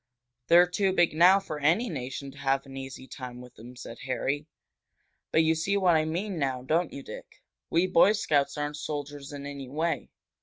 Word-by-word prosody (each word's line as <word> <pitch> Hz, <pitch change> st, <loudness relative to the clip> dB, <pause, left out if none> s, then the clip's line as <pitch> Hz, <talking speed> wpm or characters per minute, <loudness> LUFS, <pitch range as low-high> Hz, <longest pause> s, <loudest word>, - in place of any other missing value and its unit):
"They're 175 Hz, +1 st, +7 dB
too 185 Hz, +2 st, 0 dB
big 175 Hz, -3 st, +3 dB
now 180 Hz, +5 st, +6 dB
for 155 Hz, -6 st, -6 dB
any 170 Hz, +12 st, +2 dB
nation 135 Hz, -, -5 dB
to 140 Hz, -, -17 dB
have 135 Hz, 0 st, 0 dB
an 135 Hz, 0 st, -11 dB
easy 135 Hz, -1 st, -7 dB
time 125 Hz, -3 st, -8 dB
with 125 Hz, 0 st, -12 dB
them," 120 Hz, +3 st, -12 dB
said 120 Hz, -1 st, -9 dB
Harry. 135 Hz, +3 st, -2 dB, 0.8 s
"But 160 Hz, -, +4 dB
you 160 Hz, 0 st, +3 dB
see 175 Hz, +5 st, 0 dB
what 180 Hz, -4 st, +4 dB
I 155 Hz, 0 st, +2 dB
mean 175 Hz, +3 st, -3 dB
now, 130 Hz, -3 st, -1 dB
don't 160 Hz, +5 st, +1 dB
you, 140 Hz, -, -8 dB
Dick? -, -, -11 dB, 0.3 s
We 170 Hz, +2 st, +3 dB
Boy 185 Hz, +2 st, +5 dB
Scouts 145 Hz, -9 st, +1 dB
aren't 145 Hz, 0 st, -3 dB
soldiers 145 Hz, -1 st, -5 dB
in 140 Hz, -1 st, -7 dB
any 140 Hz, -2 st, -7 dB
way. 155 Hz, 0 st, -2 dB
150 Hz, 195 wpm, -28 LUFS, 135-170 Hz, 0.8 s, They're